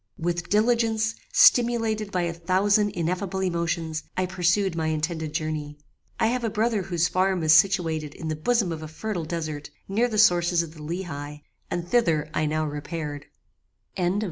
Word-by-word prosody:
"With 175 +1 -2
diligence, 220 0 +2 0.2
stimulated 235 - +4
by 180 -2 0
a 170 -1 -1
thousand 195 +5 +2
ineffable 185 +3 -2
emotions, 170 -3 -1 0.2
I 185 - +1
pursued 180 +1 +1
my 160 -1 -1
intended 160 0 -2
journey. 155 -1 -3 0.4
I - - +3
have 245 +2 0
a 225 - +1
brother 220 0 0
whose 175 -2 0
farm 185 -1 +1
is 155 0 +5
situated 160 -4 +2
in 160 - -6
the 155 - -1
bosom 205 +3 +1
of 160 -1 -5
a 155 - -6
fertile 175 +2 -4
desert, 155 -3 -4 0.2
near 220 +5 +1
the 220 -3 -3
sources 175 -4 +4
of 160 -2 -9
the 155 - -12
Leheigh, 150 -3 -6 0.3
and 175 0 -3
thither 165 -8 +1
I 155 - 0
now 155 +1 0
repaired." 145 0 -5
175 Hz, 165 wpm, -25 LUFS, 155-205 Hz, 0.4 s, is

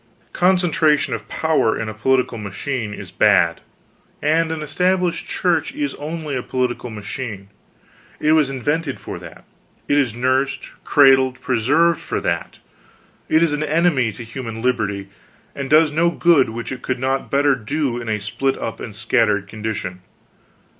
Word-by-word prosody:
Concentration 165 -7 +2
of 110 -2 -5
power 160 -3 +1
in 110 - -3
a 110 - -4
political 125 +2 +1
machine 105 +3 -4
is - - -8
bad; 85 0 +3 0.6
and 160 +2 +1
an 160 -1 -3
Established 180 +3 0
Church 170 - 0
is 290 -1 -2
only 155 -1 -5
a 125 - -1
political 125 -1 -2
machine; 105 -1 -6 0.7
it 155 - +2
was 155 -3 +4
invented 145 +2 -2
for - - -7
that; - - -12 0.4
it 145 - +3
is 125 -6 0
nursed, 130 +2 0
cradled, 130 -2 +4
preserved 145 +8 +2
for - - -3
that; - - -3 0.7
it 160 +1 +4
is 160 -3 +2
an 150 - -1
enemy 155 -6 +2
to 120 - -8
human 115 -1 -7
liberty, 100 -6 -1 0.5
and 135 -1 -4
does 155 0 +5
no 165 +3 +2
good 170 -6 +3
which 115 +3 -6
it 130 -1 -6
could 130 - -2
not 130 +1 -1
better 140 0 +3
do 135 0 -2
in 115 - -6
a 105 -1 0
split 135 +7 -1
up 115 - -5
and 105 -4 -7
scattered 105 -2 +1
condition. 105 -4 -5
130 Hz, 155 wpm, -20 LUFS, 115-155 Hz, 0.7 s, does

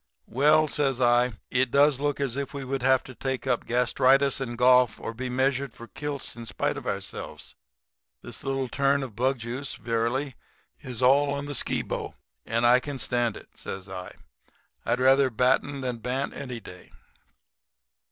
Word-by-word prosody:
"'Well,' 150 +5 +4
says 135 -3 0
I, 120 0 +3 0.2
'it 130 0 +2
does 140 +1 +4
look 145 0 -1
as 135 -4 -1
if 140 +1 -4
we 140 -1 -5
would 135 0 -2
have 130 0 +3
to 130 - -11
take 130 +1 -3
up 120 - 0
gastritis 130 +3 +3
and 120 -2 -4
golf 125 -1 +4
or 115 - -5
be 125 +2 -5
measured 130 0 0
for 120 - -11
kilts 145 0 -5
in 115 -1 -9
spite - - -1
of - - -7
ourselves. - - -5 0.7
This - - -9
little 135 -1 -1
turn 140 +2 +1
in 130 - -5
bug 130 +5 0
juice 125 +4 -5
is, - - -7
verily, 120 +4 -1 0.7
all 140 +2 +4
to 140 - -5
the 145 - -4
Skibo. - - -1 0.3
And 115 +1 +1
I 125 +1 +6
can 145 +1 -6
stand 120 -3 0
it,' - - -16
says 95 0 -7
I, 90 -1 -8 0.7
'I'd 125 - +1
rather 135 +1 +5
batten 130 +4 +1
than 125 -2 -3
bant 125 +4 -2
any 125 -4 -6
day.' 90 -4 -13
130 Hz, 170 wpm, -26 LUFS, 120-140 Hz, 0.7 s, I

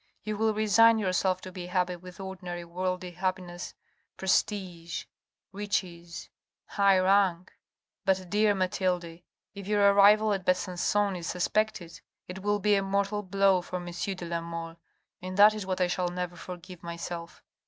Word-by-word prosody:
You 215 0 -3
will 220 0 +1
resign 225 +2 +5
yourself 185 -2 0
to 185 - -8
be 180 -1 -7
happy 180 0 0
with 180 +1 -12
ordinary 180 -2 -6
worldly 180 +1 -3
happiness, 180 -1 -4 0.4
prestige, 185 -3 -1 0.5
riches, 180 -5 -4 0.4
high 200 -1 +3
rank. 185 -2 +2 0.5
But, 190 -2 0
dear 210 0 +3
Mathilde, 180 -3 -1 0.3
if 200 -1 -9
your 205 -1 +4
arrival 210 +2 +6
at 195 -2 -3
Besancon 185 +2 +1
is 170 - -6
suspected, 180 -3 -1 0.3
it 180 +1 -7
will 205 +1 +1
be 210 +1 +2
a 200 - +3
mortal 200 +1 0
blow 195 -1 +3
for 180 - -8
M. 175 -1 -4
de 180 0 -4
la 170 0 -2
Mole, 165 0 -6 0.4
and 185 +1 -6
that 210 +1 +8
is 210 -3 -6
what 185 -1 -2
I 180 - +4
shall 175 0 -1
never 180 0 -4
forgive 180 0 -9
myself. 170 0 -7
185 Hz, 155 wpm, -28 LUFS, 175-200 Hz, 0.5 s, that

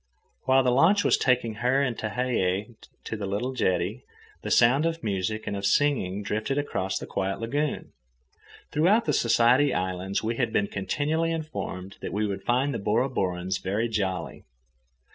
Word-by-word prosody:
While 130 0 +4
the 125 - +2
launch 170 +11 +4
was - - +4
taking 125 -3 +1
her 125 +3 +3
and 125 -4 -1
Tehei 110 -3 -1 0.3
to - - -4
the 105 -2 -4
little 110 +7 -2
jetty, 95 -7 -1 0.4
the - - -5
sound 135 +7 +4
of 165 0 -4
music 105 +2 -2
and 100 - -3
of 100 - -5
singing 105 -5 +1
drifted 110 +7 -2
across 95 -10 -2
the - - -5
quiet 95 0 -2
lagoon. 145 +6 -2 0.8
Throughout 195 +10 +3
the - - +1
Society 120 +4 +3
Islands 95 +2 -2
we 115 +1 -2
had 120 -4 0
been 105 - +2
continually 150 +12 -1
informed 150 - -5
that - - -5
we 105 +2 0
would 100 -2 -3
find 130 +6 +1
the 115 - -3
Bora 110 +6 +1
Borans 95 -3 -2
very 105 +5 -1
jolly. 95 -5 -3
115 Hz, 165 wpm, -26 LUFS, 100-135 Hz, 0.8 s, While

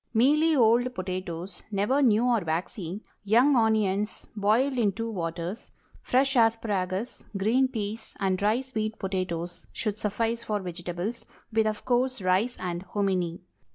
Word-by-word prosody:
Mealy 300 +7 +4
old 245 0 +4
potatoes—never 185 +6 -2
new 230 -3 +4
or 240 -2 +3
waxy—young 200 - 0
onions, 215 -2 +1
boiled 220 +7 +2
in 220 -5 +2
two 230 +3 -4
waters; 170 +2 -4 0.3
fresh 270 +2 +2
asparagus, 220 -3 +1
green 235 +7 +3
peas, 220 -3 -5
and 190 -2 +1
dry 215 +5 +2
sweet 220 -4 -3
potatoes 180 -2 -3
should 215 -1 -3
suffice 230 +3 -1
for 210 -1 -1
vegetables, 180 +4 -5 0.3
with, 220 0 +3
of 215 -1 -3
course, 255 +1 +1
rice 190 +6 +1
and 175 -1 -3
hominy. 185 -3 -1
210 Hz, 125 wpm, -27 LUFS, 185-235 Hz, 0.3 s, Mealy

